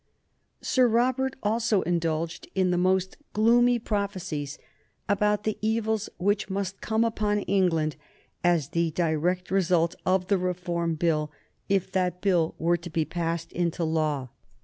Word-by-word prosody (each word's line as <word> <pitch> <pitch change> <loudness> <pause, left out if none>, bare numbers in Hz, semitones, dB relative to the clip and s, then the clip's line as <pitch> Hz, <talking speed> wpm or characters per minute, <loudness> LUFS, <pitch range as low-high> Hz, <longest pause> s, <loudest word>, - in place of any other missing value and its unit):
Sir 255 -2 +3
Robert 255 +3 +1
also 220 -1 +1
indulged 165 -1 -1
in 185 -1 +2
the 175 - +1
most 185 +1 +1 0.2
gloomy 240 +3 +4
prophecies 195 -10 -3 0.5
about 210 0 +1
the 215 0 -2
evils 220 0 0
which 205 +3 0
must 195 0 -3
come 220 +1 +1
upon 210 -2 0
England 170 -7 +1 0.5
as 170 -5 +2
the 170 0 +1
direct 175 +3 0
result 175 -3 +2
of 185 0 +2
the 195 0 +1
Reform 175 -2 -1
Bill 155 -2 0 0.4
if 195 -2 +1
that 180 -2 0
Bill 180 -5 +1
were 170 +1 +2
to 175 +1 -9
be 160 -1 0
passed 165 -1 -3
into 170 0 -1
law. 155 -5 0
180 Hz, 140 wpm, -27 LUFS, 165-210 Hz, 0.5 s, gloomy